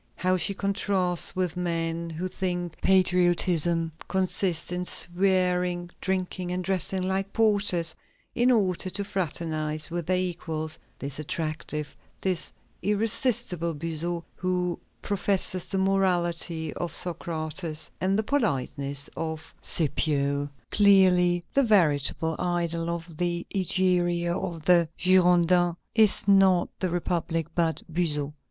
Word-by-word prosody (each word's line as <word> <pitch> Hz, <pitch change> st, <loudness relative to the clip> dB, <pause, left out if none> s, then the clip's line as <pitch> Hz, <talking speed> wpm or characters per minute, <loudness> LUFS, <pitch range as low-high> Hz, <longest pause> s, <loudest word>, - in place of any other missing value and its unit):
How 185 Hz, 0 st, +1 dB
she 185 Hz, +3 st, 0 dB
contrasts 195 Hz, -3 st, +1 dB
with 185 Hz, -2 st, -1 dB
men 170 Hz, -1 st, -2 dB
who 165 Hz, +3 st, -4 dB
think 175 Hz, -2 st, -3 dB
patriotism 175 Hz, -3 st, +2 dB, 0.2 s
consists 185 Hz, -3 st, -1 dB
in 180 Hz, 0 st, -1 dB
"swearing, 180 Hz, -1 st, +1 dB
drinking, 185 Hz, -1 st, -2 dB
and 180 Hz, 0 st, -2 dB
dressing 190 Hz, 0 st, -1 dB
like 190 Hz, +1 st, -1 dB
porters, 205 Hz, -7 st, +3 dB, 0.4 s
in 245 Hz, +1 st, +2 dB
order 190 Hz, -6 st, +1 dB
to 195 Hz, +3 st, -3 dB
fraternize 155 Hz, -4 st, -2 dB
with 170 Hz, -2 st, -3 dB
their 185 Hz, 0 st, +2 dB
equals," 165 Hz, -3 st, -1 dB, 0.2 s
this 140 Hz, +1 st, -5 dB
attractive, 155 Hz, -1 st, -4 dB, 0.2 s
this 185 Hz, -3 st, -2 dB, 0.3 s
irresistible 205 Hz, -5 st, 0 dB
Buzot, 165 Hz, +2 st, -3 dB
who 180 Hz, -1 st, -1 dB, 0.2 s
"professes 195 Hz, -2 st, 0 dB
the 195 Hz, -, 0 dB
morality 175 Hz, -4 st, 0 dB
of 175 Hz, -3 st, -3 dB
Socrates 160 Hz, -2 st, -2 dB
and 190 Hz, +2 st, +1 dB
the 220 Hz, -, 0 dB
politeness 140 Hz, -, -2 dB
of 160 Hz, 0 st, -5 dB
Scipio"! 145 Hz, -2 st, 0 dB, 0.2 s
Clearly, 180 Hz, -3 st, +5 dB
the 275 Hz, -, +4 dB
veritable 160 Hz, -, +2 dB
idol 170 Hz, -1 st, -1 dB
of 170 Hz, -1 st, -6 dB
the 175 Hz, 0 st, -1 dB
Egeria 175 Hz, -2 st, +1 dB
of 165 Hz, -4 st, -5 dB
the 170 Hz, -3 st, +4 dB
Girondins 180 Hz, -1 st, +4 dB, 0.2 s
is 215 Hz, -3 st, +4 dB
not 195 Hz, -3 st, +4 dB
the 185 Hz, -, -1 dB
republic, 170 Hz, -1 st, -2 dB
but 165 Hz, -2 st, 0 dB
Buzot. 150 Hz, -4 st, -2 dB
175 Hz, 115 wpm, -26 LUFS, 165-185 Hz, 0.4 s, Clearly